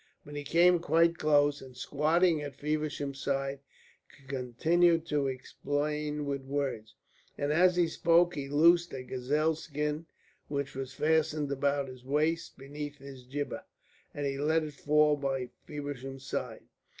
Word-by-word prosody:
But 145 - -9
he 145 - -4
came 175 +4 +4
quite 165 +1 +3
close, 145 -1 +3
and 130 -2 -12
squatting 155 +4 +2
at 145 -1 -6
Feversham's 145 -2 -3
side 135 0 -1 0.7
continued 160 +6 +2
to 145 -4 0
explain 150 +3 -2
with 140 -1 -2
words. 135 -6 -3 0.4
And 145 +1 0
as 180 +2 +5
he 175 -1 +3
spoke 170 +1 +3
he 140 -3 -5
loosed 170 +3 +4
a 130 - -5
gazelle 145 +6 0
skin 150 0 -3 0.4
which 140 -1 -3
was 135 0 -6
fastened 155 -1 +1
about 140 0 0
his 130 -1 -11
waist 155 +5 0
beneath 145 +2 -7
his 135 -2 -11
jibbeh, 145 +3 -4 0.5
and 145 - -4
he 135 0 -2
let 160 +2 +2
it 150 -1 -6
fall 150 +1 +3
by 135 -3 -2 0.2
Feversham's 135 -2 -6
side. - - -4
145 Hz, 145 wpm, -30 LUFS, 135-155 Hz, 0.7 s, as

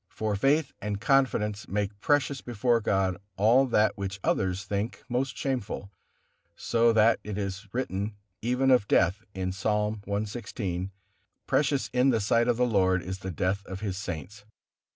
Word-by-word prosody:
For 110 -1 -2
faith 140 +7 +2
and 105 0 -3
confidence 110 -3 +1
make 100 0 -3
precious 145 -2 +1
before 120 0 +1
God 95 -3 +1 0.2
all 120 +7 +5
that 105 -4 +2
which 100 0 -4
others 95 0 0
think 105 +3 -3
most 125 +1 -1
shameful, 125 -7 -3 0.6
so 115 0 +2
that 115 +1 +4
it 105 -1 -5
is 100 +1 -4
written 105 -4 -2 0.3
even 125 +3 +2
of 125 -6 +4
death 95 +5 +2
in 95 -1 -2
Psalm 105 +2 -1
cxvi, 100 -3 -3 0.6
"Precious 140 -2 +1
in 125 +2 +4
the 115 -4 +3
sight 115 +3 +2
of 120 -2 +2
the 125 - +3
Lord 95 -5 +2
is 95 +1 -5
the 95 - -5
death 95 +3 -1
of 95 0 -6
His 100 -3 -2
saints." 95 +2 -6
105 Hz, 155 wpm, -28 LUFS, 95-120 Hz, 0.6 s, all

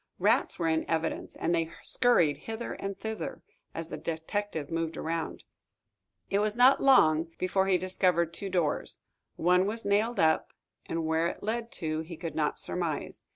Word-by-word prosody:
Rats - - +2
were 170 - 0
in 160 0 +2
evidence, 165 0 -2
and 170 - 0
they 165 -1 +1
scurried 170 - +3
hither 225 +1 -4
and 195 0 -5
thither 220 0 -5 0.3
as 165 0 -5
the - - -5
detective 165 -1 -3
moved 165 -1 -2
around. 165 0 -3 0.9
It 200 - +3
was 210 0 0
not 250 +3 +6
long 165 - +5
before 190 +1 +1
he 190 -1 +4
discovered 180 -2 +1
two 195 +3 -5
doors. 175 -5 -1 0.3
One 180 +2 +3
was 225 +2 -4
nailed 210 +4 +1
up, 160 -1 +2 0.3
and 165 -1 -2
where 160 +1 +2
it - - -6
led 230 +2 -2
to, 155 -1 -1
he 160 +1 -7
could 165 -1 -5
not 150 -1 0
surmise. 170 -4 -3
170 Hz, 165 wpm, -29 LUFS, 160-205 Hz, 0.9 s, not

